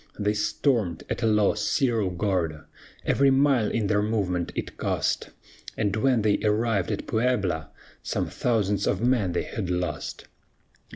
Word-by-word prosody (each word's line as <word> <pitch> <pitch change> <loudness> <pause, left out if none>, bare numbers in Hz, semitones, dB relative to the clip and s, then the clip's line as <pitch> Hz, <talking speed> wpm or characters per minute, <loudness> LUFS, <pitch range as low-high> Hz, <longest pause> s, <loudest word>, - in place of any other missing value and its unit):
They 105 0 +1
stormed, 105 - 0
at - - -2
a 115 - +2
loss, 105 -1 +2
Cerro 115 - +1
Gordo 90 -5 -1 0.4
Every 140 0 +4
mile 135 -5 +3
in 115 -3 -1
their 105 +1 +2
movement 100 -5 -1
it - - -4
cost; - - -1 0.5
And 100 -2 0
when 115 0 +2
they 105 -1 +2
arrived 105 -3 +1
at - - -3
Puebla, 100 -10 0 0.3
Some - - -2
thousands 105 -4 0
of 95 - +1
men 120 -7 +2
they - - 0
had 100 -6 -4
lost. 90 -4 -3
105 Hz, 150 wpm, -26 LUFS, 95-115 Hz, 0.5 s, Every